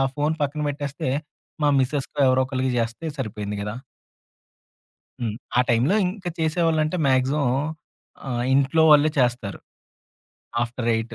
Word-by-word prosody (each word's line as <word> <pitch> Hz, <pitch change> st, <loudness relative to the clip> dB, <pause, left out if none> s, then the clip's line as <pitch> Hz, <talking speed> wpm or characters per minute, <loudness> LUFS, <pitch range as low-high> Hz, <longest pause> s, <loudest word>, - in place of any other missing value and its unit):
Phone 150 Hz, +2 st, 0 dB
పక్కన 145 Hz, +1 st, -1 dB
పెట్టేస్తే, 140 Hz, -2 st, -3 dB, 0.5 s
మా 145 Hz, -, +4 dB
మిసెస్‌కో 140 Hz, +2 st, -1 dB
ఎవరోకళ్ళకి 130 Hz, 0 st, +1 dB
జేస్తే 115 Hz, +8 st, -2 dB
సరిపోయింది 105 Hz, -5 st, -4 dB
గదా! 105 Hz, +1 st, -4 dB, 1.5 s
హ్మ్. 110 Hz, -3 st, -2 dB, 0.2 s
ఆ -, -, +6 dB
టైంలో 120 Hz, -, +3 dB
ఇంక 185 Hz, +1 st, -7 dB
చేసేవాళ్ళంటే, 160 Hz, 0 st, +1 dB
మాక్సిమం 135 Hz, +2 st, +2 dB, 0.8 s
ఆహ్, 120 Hz, -1 st, -1 dB
ఇంట్లో 140 Hz, +4 st, +3 dB
వాళ్ళే 150 Hz, +1 st, +6 dB
చేస్తారు. 120 Hz, -5 st, 0 dB, 1.0 s
ఆఫ్టర్ 120 Hz, 0 st, -3 dB
8:00 115 Hz, +1 st, -3 dB
130 Hz, 115 wpm, -23 LUFS, 120-150 Hz, 1.5 s, ఆ